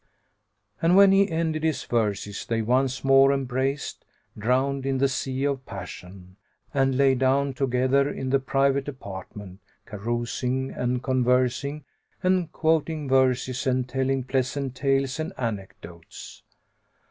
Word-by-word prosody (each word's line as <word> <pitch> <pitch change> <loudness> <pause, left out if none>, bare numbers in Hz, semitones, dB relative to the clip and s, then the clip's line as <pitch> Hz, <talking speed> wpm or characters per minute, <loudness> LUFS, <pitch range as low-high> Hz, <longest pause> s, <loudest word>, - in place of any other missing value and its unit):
And 170 +2 +4
when 200 -1 +8
he 195 0 +4
ended 160 -1 -1
his 160 -3 0
verses 105 -3 -2
they 115 -1 0
once 130 +3 +1
more 135 0 +6
embraced, 135 +1 -2 0.3
drowned 130 +5 0
in 135 0 0
the 140 +1 +3
sea 130 0 -3
of 140 -2 -1
passion; 90 0 -10 0.4
and 135 -2 +2
lay 135 -1 +4
down 135 +2 +1
together 130 +1 +1
in 130 -2 -4
the 135 - +3
private 135 +1 +1
apartment 100 -6 -8 0.3
carousing 120 +4 -3
and 125 0 -2
conversing 130 +3 +1 0.4
and 185 -3 +1
quoting 160 -2 0
verses 130 0 +1
and 130 -1 +1
telling 135 0 -1
pleasant 130 +1 -2
tales 135 +1 0
and 155 +4 -3
anecdotes. 95 -7 -7
130 Hz, 125 wpm, -25 LUFS, 125-140 Hz, 0.4 s, when